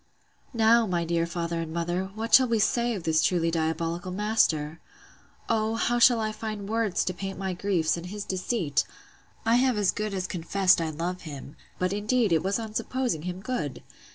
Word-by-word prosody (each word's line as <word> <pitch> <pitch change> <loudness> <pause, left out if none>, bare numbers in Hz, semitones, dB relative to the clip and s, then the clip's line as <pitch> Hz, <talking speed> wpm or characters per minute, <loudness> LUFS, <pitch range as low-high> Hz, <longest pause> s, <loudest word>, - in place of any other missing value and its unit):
Now, 225 0 +4
my 175 -2 0
dear 170 0 0
father 170 -1 -3
and 160 -1 -5
mother, 175 +3 -1
what 225 +1 -4
shall 260 -1 +8
we 230 -1 +1
say 235 +2 +1
of 185 - -6
this 160 -1 +2
truly 165 -2 +1
diabolical 165 +2 -2
master! 175 -7 +1 0.7
O, 220 0 +1
how 240 +1 +1
shall 240 -1 +6
I 215 -1 -1
find 215 -2 -5
words 220 -3 0
to 185 - -1
paint 195 +1 -6
my 190 -1 -2
griefs, 175 -4 0
and 170 +1 -7
his 205 +2 -6
deceit! 185 -4 0 0.6
I 230 +1 +4
have 255 -2 +2
as 205 -3 +3
good 210 -1 -3
as 185 -1 -2
confessed 185 +1 +2
I 160 - -1
love 170 +4 -4
him; 145 -2 -9 0.2
but, 185 +1 0
indeed, 215 +1 +1
it 160 - +3
was 195 +1 0
on 220 -2 -6
supposing 250 -7 -1
him 180 +2 -5
good. 195 - -4
190 Hz, 190 wpm, -27 LUFS, 170-220 Hz, 0.7 s, shall